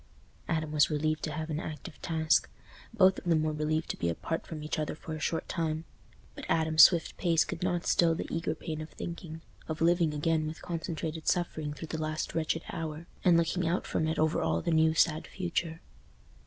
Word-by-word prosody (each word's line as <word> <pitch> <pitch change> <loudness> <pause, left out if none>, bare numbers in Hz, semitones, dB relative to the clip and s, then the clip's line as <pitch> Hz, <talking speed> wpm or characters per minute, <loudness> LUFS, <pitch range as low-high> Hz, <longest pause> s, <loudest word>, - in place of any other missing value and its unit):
Adam 155 -1 -1
was 150 -1 +4
relieved 155 0 0
to 155 - -3
have 155 +1 -4
an 155 - -1
active 155 -2 -7
task—both 165 +3 +1
of - - -18
them 165 -3 +2
were 155 0 0
relieved 155 +1 -1
to - - -3
be 85 - 0
apart 165 - -3
from 155 -2 -6
each 155 +1 -2
other 155 -1 -2
for 160 - -7
a 155 - -4
short 160 +2 -1
time. 160 -1 -2 0.5
But - - -8
Adam's 160 -1 +4
swift 170 -3 +1
pace 165 -3 +3
could - - -6
not 180 -1 0
still 165 -1 +3
the - - -3
eager 165 -1 -1
pain 155 0 -5
of 155 - -7
thinking—of 160 -2 -8
living 170 -1 +3
again 155 +1 +1
with 155 +1 -7
concentrated 160 -2 -4
suffering 155 -4 0
through 160 +2 -8
the 160 - -3
last 155 0 -2
wretched 165 0 -1
hour, 160 0 -5 0.2
and 175 -2 +6
looking 170 +1 +1
out 175 +3 0
from 160 - 0
it 160 - -1
over 155 0 +2
all 80 0 0
the - - 0
new 160 0 +4
sad 160 -1 +2
future. 170 -3 -3
160 Hz, 200 wpm, -30 LUFS, 155-165 Hz, 0.5 s, and